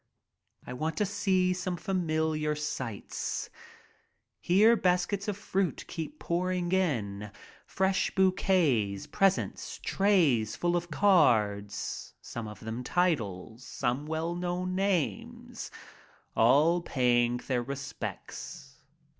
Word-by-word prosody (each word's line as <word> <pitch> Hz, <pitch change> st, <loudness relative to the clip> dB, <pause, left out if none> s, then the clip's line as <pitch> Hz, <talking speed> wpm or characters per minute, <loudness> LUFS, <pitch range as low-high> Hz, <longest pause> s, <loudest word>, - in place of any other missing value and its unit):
I -, -, -6 dB
want 155 Hz, +4 st, -3 dB
to 210 Hz, -, +2 dB
see 190 Hz, -2 st, +1 dB
some 180 Hz, -1 st, -3 dB
familiar 160 Hz, -5 st, 0 dB
sights. 140 Hz, -8 st, -4 dB, 0.9 s
Here 210 Hz, +6 st, +5 dB
baskets 185 Hz, +1 st, +1 dB
of 205 Hz, -2 st, -2 dB
fruit 195 Hz, -3 st, -1 dB
keep 175 Hz, -, -6 dB
pouring 180 Hz, -, -1 dB
in, 110 Hz, -, 0 dB, 0.4 s
fresh 190 Hz, 0 st, +1 dB
bouquets, 165 Hz, -, +2 dB
presents, 195 Hz, -1 st, 0 dB
trays 160 Hz, -, +3 dB
full 175 Hz, 0 st, 0 dB
of 175 Hz, 0 st, -2 dB
cards, 105 Hz, -, +2 dB
some 115 Hz, -2 st, -6 dB
of 105 Hz, -, -10 dB
them 110 Hz, +3 st, -5 dB
titles, 120 Hz, -, -1 dB
some 130 Hz, +3 st, -2 dB
well 160 Hz, +2 st, -2 dB
known 180 Hz, +1 st, -2 dB
names 185 Hz, -, -2 dB, 0.3 s
— -, -, -30 dB
all 150 Hz, +9 st, +4 dB
paying 120 Hz, -5 st, +2 dB
their 125 Hz, 0 st, -1 dB
respects. 140 Hz, +2 st, -7 dB
165 Hz, 105 wpm, -29 LUFS, 120-185 Hz, 0.9 s, Here